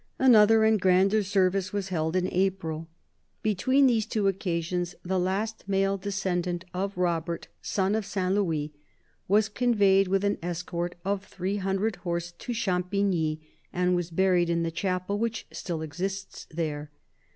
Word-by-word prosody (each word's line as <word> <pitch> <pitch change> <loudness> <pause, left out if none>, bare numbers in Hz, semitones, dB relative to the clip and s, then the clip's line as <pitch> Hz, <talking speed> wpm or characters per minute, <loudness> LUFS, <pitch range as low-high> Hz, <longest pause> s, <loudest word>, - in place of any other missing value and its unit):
Another 225 -4 +6
and 220 -2 +3
grander 190 +3 +4
service 190 -1 +1
was 200 -2 -3
held 160 -1 -1
in 185 -1 +2
April. 175 -4 -1 0.6
Between 260 +7 +3
these 225 -4 +2
two 210 -2 0
occasions, 175 -2 -1
the 185 +1 0
last 200 +5 -1
male 195 0 +2
descendant 185 -3 -2
of 195 +1 -3
Robert, 170 -1 -1
son 195 0 0
of 220 0 0
Saint 190 -2 -1
Louis, 160 -7 0 0.5
was 210 +2 +4
conveyed 205 -4 +3
with 195 +1 +1
an 200 0 0
escort 175 0 -3
of 200 0 -1
three 195 0 -3
hundred 195 +2 -1
horse 175 -1 -3
to 210 +8 -7
Champigny, 180 -6 0 0.3
and 180 0 +1
was 175 -1 -2
buried 180 0 +2
in 170 0 +1
the 165 - -1
chapel 185 +3 -2
which 230 0 -2
still 165 -4 -4
exists 190 +6 -5
there. 150 -2 -3
190 Hz, 150 wpm, -27 LUFS, 175-200 Hz, 0.6 s, Another